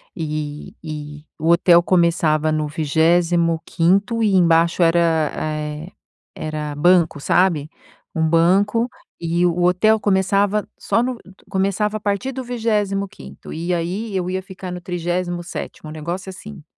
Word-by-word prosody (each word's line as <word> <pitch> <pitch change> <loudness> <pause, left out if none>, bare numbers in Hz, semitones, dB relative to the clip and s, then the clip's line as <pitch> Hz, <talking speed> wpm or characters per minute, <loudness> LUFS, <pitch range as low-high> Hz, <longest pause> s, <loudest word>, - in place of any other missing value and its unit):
e 150 -2 -5
e 150 -1 -7
o 160 +2 0
hotel 170 0 +6
começava 165 -3 +2
no 155 -1 0
25° 170 +6 +1
e 210 -2 +2
embaixo 170 -1 +4
era 165 -2 +2
eh, 150 +2 -4 0.4
era 150 -1 -4
banco, 170 0 +3
sabe, 160 -3 +2 0.5
um 160 -1 +1
banco 195 +8 +3 0.3
e 170 +1 +1
o 175 +1 0
hotel 215 +5 +3
começava 200 +1 +1
só 230 - +1
no 255 0 -2 0.3
começava 200 +2 0
a - - -9
partir 205 +5 -2
do 260 0 -5
25° 205 - -3
e 170 +3 -2
aí 190 +5 -3
eu 180 -1 -1
ia 185 +1 -2
ficar 190 -1 -8
no 180 - -5
37°, 175 -2 -4
um - - -8
negócio 170 +5 -5
assim 190 -1 -10
175 Hz, 130 wpm, -20 LUFS, 160-195 Hz, 0.5 s, hotel